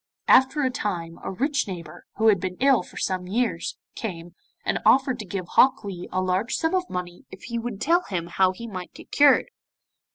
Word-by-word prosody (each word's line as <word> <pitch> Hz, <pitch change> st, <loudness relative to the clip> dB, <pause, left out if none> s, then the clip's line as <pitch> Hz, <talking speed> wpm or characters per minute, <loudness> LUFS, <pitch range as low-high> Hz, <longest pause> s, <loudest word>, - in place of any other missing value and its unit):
After 265 Hz, +3 st, +5 dB
a 260 Hz, -, +1 dB
time 175 Hz, -9 st, -4 dB
a -, -, -3 dB
rich 275 Hz, +9 st, -1 dB
neighbour, 170 Hz, -5 st, -8 dB
who 220 Hz, +1 st, +4 dB
had 200 Hz, -3 st, +4 dB
been 180 Hz, 0 st, -4 dB
ill 270 Hz, -4 st, +4 dB
for -, -, -13 dB
some 185 Hz, -1 st, -2 dB
years, 215 Hz, -4 st, -1 dB, 0.2 s
came, 175 Hz, -6 st, -6 dB, 0.3 s
and -, -, 0 dB
offered 265 Hz, -2 st, +4 dB
to 210 Hz, -, -5 dB
give 185 Hz, -1 st, -4 dB
Hok 260 Hz, -3 st, +4 dB
Lee 185 Hz, -3 st, -6 dB
a 185 Hz, 0 st, 0 dB
large 185 Hz, +5 st, 0 dB
sum 320 Hz, +2 st, 0 dB
of 365 Hz, -1 st, 0 dB
money 180 Hz, -1 st, -6 dB
if 190 Hz, -, -12 dB
he 235 Hz, 0 st, -3 dB
would 230 Hz, -3 st, -5 dB
tell 340 Hz, +7 st, +3 dB
him 175 Hz, -4 st, -3 dB
how 185 Hz, +2 st, +2 dB
he 210 Hz, +5 st, -9 dB
might 185 Hz, -5 st, -7 dB
get -, -, -13 dB
cured. 290 Hz, +11 st, +5 dB
200 Hz, 205 wpm, -25 LUFS, 180-255 Hz, 0.3 s, After